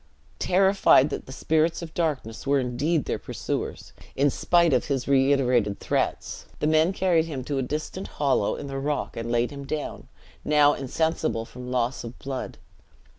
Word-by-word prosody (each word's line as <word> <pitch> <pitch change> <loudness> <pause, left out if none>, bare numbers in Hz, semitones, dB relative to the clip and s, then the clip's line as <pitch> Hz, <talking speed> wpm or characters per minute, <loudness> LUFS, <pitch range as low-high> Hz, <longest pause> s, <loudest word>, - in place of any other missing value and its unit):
Terrified 190 -6 +4
that - - -5
the - - -9
spirits 160 +5 0
of 160 -1 -9
darkness 140 -9 -2
were 140 0 +3
indeed 135 +5 0
their - - -2
pursuers, - - -5 0.2
in 140 +1 +3
spite 170 0 +3
of 125 - +2
his 135 -4 -2
reiterated 130 -6 +2
threats, - - -2
the - - -1
men 155 +3 +3
carried 180 -4 +2
him 140 -6 -5
to 140 +1 -2
a - - +1
distant 155 +8 -4
hollow 135 -8 +1
in - - -7
the 135 -1 -4
rock, 145 +1 -2
and 115 +1 -4
laid 120 +2 +1
him 140 -1 -7
down, 150 +1 -5 0.4
now 150 -1 +4
insensible 150 -3 -1
from 125 +1 -9
loss 125 0 -1
of 120 +1 -8
blood. 135 -1 -5
140 Hz, 170 wpm, -25 LUFS, 125-160 Hz, 0.4 s, Terrified